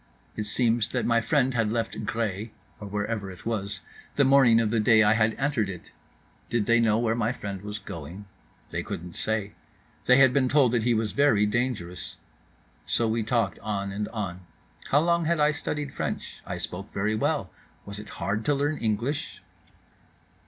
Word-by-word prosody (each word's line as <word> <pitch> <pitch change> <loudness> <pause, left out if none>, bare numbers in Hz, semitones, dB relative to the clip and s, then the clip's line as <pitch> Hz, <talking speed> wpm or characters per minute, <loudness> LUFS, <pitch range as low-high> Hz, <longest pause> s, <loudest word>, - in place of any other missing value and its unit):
—It 105 - -3
seems 115 0 +2
that - - 0
my 115 -1 +3
friend 130 0 +2
had 115 -3 +1
left 115 -2 -2
Gré 110 -1 -2 0.3
(or 105 - -7
whatever 105 0 -3
it 90 - -12
was) 100 -4 -2 0.3
the 140 - +4
morning 130 -4 +6
of 110 -2 +1
the 115 - +2
day 110 +1 +5
I 105 +1 +5
had 110 0 +2
entered 135 -7 0
it.—Did 100 +4 -7
they 115 +1 +4
know 110 -2 +3
where 115 -1 +1
my 115 -1 0
friend 100 -6 -6
was 105 0 -5
going?—They 95 0 -9
couldn't 85 +1 -6
say. 110 -2 -1 0.5
They 125 - +7
had 130 -2 +6
been 130 -2 +2
told 135 -3 +4
that 120 -1 +2
he 120 +1 +2
was 110 -1 0
very 140 -8 +4
dangerous.—So 115 0 -3
we 115 +1 0
talked 110 -2 0
on 100 -2 -3
and 105 +1 -3
on: 95 -5 -5 0.4
How 145 - +4
long 170 0 +2
had 170 0 +1
I 150 0 +4
studied 145 -1 -4
French? - - -4
I - - -3
spoke 95 +3 -5
very 105 +2 0
well. 110 - 0 0.3
Was 100 0 -6
it 105 - -10
hard 105 +3 -1
to 145 - +3
learn 145 +2 0
English? 115 +6 -2
110 Hz, 175 wpm, -26 LUFS, 105-125 Hz, 0.5 s, They